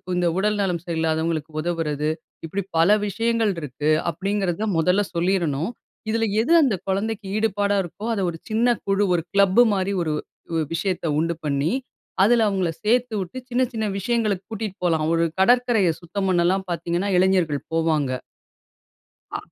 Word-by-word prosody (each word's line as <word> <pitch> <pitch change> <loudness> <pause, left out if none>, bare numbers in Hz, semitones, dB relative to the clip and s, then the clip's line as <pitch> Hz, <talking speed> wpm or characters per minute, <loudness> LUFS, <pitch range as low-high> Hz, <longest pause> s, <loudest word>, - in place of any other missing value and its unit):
இந்த 180 -1 +1
உடல் 210 +2 +1
நலம் 180 -4 -1
சரியில்லாதவங்களுக்கு 160 -1 -1
உதவுறது, 155 -3 -1 0.4
இப்படி 190 +5 -3 0.2
பல 165 +3 +5 0.2
விஷயங்கள் 230 +1 +1
இருக்கு. 150 +1 -3 0.2
அப்படிங்கிறத 195 0 -1
மொதல்ல 180 +5 +3
சொல்லிரனும். 170 -2 0 0.4
இதுல 225 +1 +1 0.2
எது 295 +9 +2
அந்த 250 -8 +2
கொழந்தைக்கு 205 +2 -2
ஈடுபாடா 205 -2 +1
இருக்கோ, 185 +5 -8
அத 200 - -1
ஒரு 165 - -6
சின்ன 235 +2 +2
குழு 195 +1 +2
ஒரு 170 - +2
கிளப் 200 +3 +5
மாரி 195 0 0
ஒரு 155 -2 -1 0.4
உ - - +1 0.2
விஷயத்த 180 +1 -2
உண்டு 165 +1 0
பண்ணி, 145 +3 0 0.5
அதுல 230 +2 +4
அவங்கள 185 -4 0
சேர்த்துவுட்டு, 220 -2 0
சின்ன 250 +1 +1
சின்ன 220 -1 -1
விஷயங்களுக்கு 210 -3 0
கூட்டிட்டு 215 -3 -4
போலாம். 160 -3 +2
ஒரு 165 0 +2 0.2
கடற்கரைய 240 -4 +4
சுத்தம் 195 +3 -3
பண்ணலாம். 185 +2 +2
பார்த்தீங்கன்னா 175 +3 -1
இளைஞர்கள் 180 -6 +2
போவாங்க. 160 -4 +1 1.2
அ. - - -1
190 Hz, 140 wpm, -23 LUFS, 165-210 Hz, 1.2 s, பல